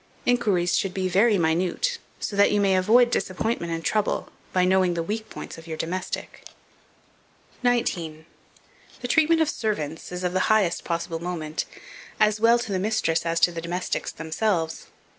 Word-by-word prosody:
Inquiries 200 Hz, -8 st, +2 dB
should 190 Hz, -1 st, -1 dB
be 190 Hz, -1 st, 0 dB
very 205 Hz, +4 st, +4 dB
minute, 180 Hz, -, 0 dB, 0.2 s
so 205 Hz, -, -4 dB
that 200 Hz, 0 st, +5 dB
you 205 Hz, -, +2 dB
may 195 Hz, -2 st, +3 dB
avoid 235 Hz, +6 st, +4 dB
disappointment 190 Hz, -2 st, -1 dB
and 165 Hz, -1 st, -4 dB
trouble, 215 Hz, -1 st, 0 dB, 0.2 s
by 185 Hz, -1 st, +3 dB
knowing 185 Hz, -1 st, +3 dB
the 165 Hz, -, -1 dB
weak 215 Hz, +4 st, -4 dB
points -, -, -8 dB
of 165 Hz, -, -14 dB
your 160 Hz, -1 st, -5 dB
domestic. 180 Hz, +4 st, -4 dB, 1.2 s
19. 170 Hz, -11 st, 0 dB, 0.8 s
THE 245 Hz, -, -3 dB
TREATMENT 315 Hz, +5 st, +4 dB
OF 315 Hz, -, +2 dB
SERVANTS 165 Hz, -9 st, -3 dB
is 180 Hz, 0 st, -5 dB
of 180 Hz, 0 st, -1 dB
the 185 Hz, -, +1 dB
highest 210 Hz, -6 st, +2 dB
possible 170 Hz, -1 st, -3 dB
moment, 160 Hz, -3 st, -3 dB, 0.5 s
as 215 Hz, 0 st, +3 dB
well 230 Hz, +2 st, +5 dB
to 235 Hz, -3 st, -4 dB
the 190 Hz, -, 0 dB
mistress 185 Hz, -5 st, 0 dB
as 165 Hz, 0 st, +1 dB
to 175 Hz, -, +5 dB
the 170 Hz, -1 st, -5 dB
domestics 175 Hz, +2 st, -3 dB
themselves. 165 Hz, 0 st, -2 dB
185 Hz, 165 wpm, -25 LUFS, 170-215 Hz, 1.2 s, that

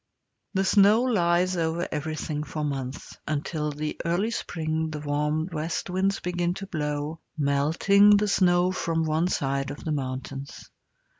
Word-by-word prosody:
The 190 Hz, -, +3 dB
snow 205 Hz, +4 st, +5 dB
lies 180 Hz, -6 st, +2 dB
over 165 Hz, 0 st, -1 dB
everything 155 Hz, 0 st, -3 dB
for 155 Hz, +1 st, -4 dB
months, 135 Hz, -2 st, -5 dB
until 150 Hz, +1 st, -2 dB
in 145 Hz, -, -7 dB
the 150 Hz, 0 st, -3 dB
early 175 Hz, +7 st, 0 dB
spring 160 Hz, -6 st, -2 dB
the 155 Hz, -1 st, -5 dB
warm 150 Hz, +2 st, -1 dB
west 160 Hz, +2 st, -3 dB
winds 195 Hz, +2 st, +1 dB
begin 175 Hz, 0 st, -1 dB
to 195 Hz, -, -6 dB
blow, 150 Hz, -2 st, -3 dB, 0.2 s
melting 160 Hz, +9 st, +4 dB
the 210 Hz, +1 st, +1 dB
snow 180 Hz, -2 st, +3 dB
from 165 Hz, -3 st, -1 dB
one 160 Hz, +2 st, +1 dB
side 135 Hz, -5 st, -1 dB
of 145 Hz, -, -8 dB
the 160 Hz, -, -1 dB
mountains. 135 Hz, 0 st, -5 dB
160 Hz, 150 wpm, -26 LUFS, 150-180 Hz, 0.2 s, snow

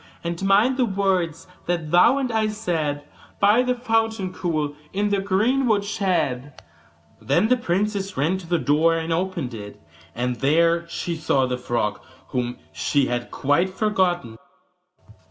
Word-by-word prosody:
And 170 Hz, +1 st, -4 dB
mind 210 Hz, +7 st, +3 dB
the 255 Hz, -, +3 dB
words 190 Hz, -6 st, -1 dB, 0.2 s
that 170 Hz, -3 st, -2 dB
thou 180 Hz, +10 st, +5 dB
and 260 Hz, -3 st, -1 dB
I 220 Hz, -1 st, +1 dB
said 165 Hz, -9 st, -2 dB, 0.4 s
By 210 Hz, +4 st, +5 dB
the 250 Hz, 0 st, 0 dB
fountain 225 Hz, -5 st, 0 dB
cool, 155 Hz, -6 st, -2 dB, 0.2 s
in 205 Hz, +2 st, 0 dB
the 200 Hz, -1 st, +1 dB
greenwood 215 Hz, +3 st, +2 dB
shade.' 155 Hz, -10 st, -1 dB, 0.7 s
Then 220 Hz, -, +2 dB
the 255 Hz, -, +5 dB
princess 200 Hz, -, -2 dB
ran 165 Hz, +7 st, +1 dB
to 175 Hz, -, -11 dB
the 175 Hz, 0 st, +1 dB
door 160 Hz, +2 st, +3 dB
and 165 Hz, 0 st, -1 dB
opened 170 Hz, -7 st, -2 dB
it, 105 Hz, -2 st, -9 dB, 0.4 s
and 125 Hz, 0 st, -2 dB
there 165 Hz, +5 st, +2 dB
she 170 Hz, 0 st, -3 dB
saw 150 Hz, -4 st, +1 dB
the 125 Hz, 0 st, -3 dB
frog, 120 Hz, -4 st, -1 dB, 0.3 s
whom 125 Hz, -1 st, -2 dB, 0.2 s
she 140 Hz, -2 st, +1 dB
had 120 Hz, 0 st, -2 dB
quite 145 Hz, +7 st, +1 dB
forgotten. 185 Hz, -, 0 dB
175 Hz, 150 wpm, -23 LUFS, 145-205 Hz, 0.7 s, thou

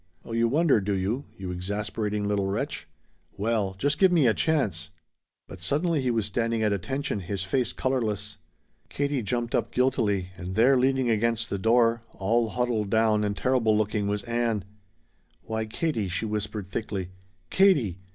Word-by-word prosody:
"Oh -, -, -9 dB
you 115 Hz, +1 st, +2 dB
wonder, 145 Hz, -2 st, +3 dB
do 100 Hz, +1 st, -1 dB
you 100 Hz, +9 st, -1 dB
you 95 Hz, -2 st, -5 dB
exasperating 105 Hz, +3 st, -2 dB
little 100 Hz, -1 st, 0 dB
wretch! 100 Hz, -, -3 dB, 0.5 s
Well 105 Hz, -2 st, 0 dB
just 145 Hz, +8 st, 0 dB
give 190 Hz, -2 st, +6 dB
me 165 Hz, -6 st, +4 dB
a 115 Hz, -, +5 dB
chance 105 Hz, -, 0 dB, 0.3 s
" -, -, -60 dB
But 95 Hz, -, -11 dB
suddenly 150 Hz, -, +1 dB
he 130 Hz, -, 0 dB
was 115 Hz, -3 st, +1 dB
standing 115 Hz, +2 st, -1 dB
at 105 Hz, -1 st, +2 dB
attention, 135 Hz, +4 st, -2 dB
his 95 Hz, +1 st, -3 dB
face 125 Hz, +4 st, 0 dB
colorless. 105 Hz, -5 st, -2 dB, 0.5 s
Katie 140 Hz, -2 st, -1 dB
jumped 120 Hz, +2 st, -2 dB
up -, -, +1 dB
guiltily, 110 Hz, -8 st, +1 dB
and 90 Hz, +1 st, -6 dB
there 125 Hz, +5 st, +5 dB
leaning 130 Hz, -1 st, +2 dB
against 115 Hz, +1 st, 0 dB
the 100 Hz, -, -1 dB
door 115 Hz, +2 st, +3 dB
all 115 Hz, +4 st, +1 dB
huddled 115 Hz, -3 st, -1 dB
down 110 Hz, -1 st, +3 dB
and 100 Hz, -1 st, -1 dB
terrible 120 Hz, -5 st, +2 dB
looking 105 Hz, -1 st, 0 dB
was 105 Hz, 0 st, -1 dB
Ann. 115 Hz, -3 st, -1 dB, 0.8 s
"Why, 110 Hz, 0 st, -3 dB
Katie," 110 Hz, -, -2 dB
she 90 Hz, +5 st, -2 dB
whispered 105 Hz, -1 st, -3 dB
thickly 95 Hz, -1 st, -4 dB, 0.4 s
"Katie! 145 Hz, -, +3 dB
110 Hz, 165 wpm, -26 LUFS, 100-125 Hz, 0.8 s, give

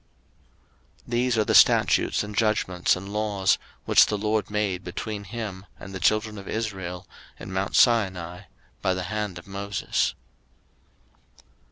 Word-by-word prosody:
03:026:046 -, -, -17 dB
These 120 Hz, 0 st, +1 dB
are 110 Hz, -, +2 dB
the -, -, 0 dB
statutes -, -, +4 dB
and 105 Hz, 0 st, -7 dB
judgments 105 Hz, -5 st, +1 dB
and 100 Hz, +3 st, -8 dB
laws, 105 Hz, -3 st, +1 dB, 0.3 s
which -, -, +6 dB
the 105 Hz, -, -1 dB
LORD 105 Hz, 0 st, -1 dB
made 105 Hz, -3 st, -1 dB
between 100 Hz, +3 st, -5 dB
him 100 Hz, -2 st, -6 dB
and 95 Hz, -, -9 dB
the 95 Hz, -, -5 dB
children 110 Hz, +3 st, +1 dB
of 95 Hz, -, -11 dB
Israel 95 Hz, -5 st, -4 dB, 0.3 s
in 95 Hz, -, -8 dB
mount 95 Hz, +1 st, -2 dB
Sinai 95 Hz, -6 st, +2 dB, 0.4 s
by 95 Hz, -, +1 dB
the 90 Hz, -, -3 dB
hand 105 Hz, -4 st, -3 dB
of 85 Hz, -, -10 dB
Moses. 100 Hz, 0 st, -2 dB
100 Hz, 145 wpm, -25 LUFS, 95-110 Hz, 0.4 s, which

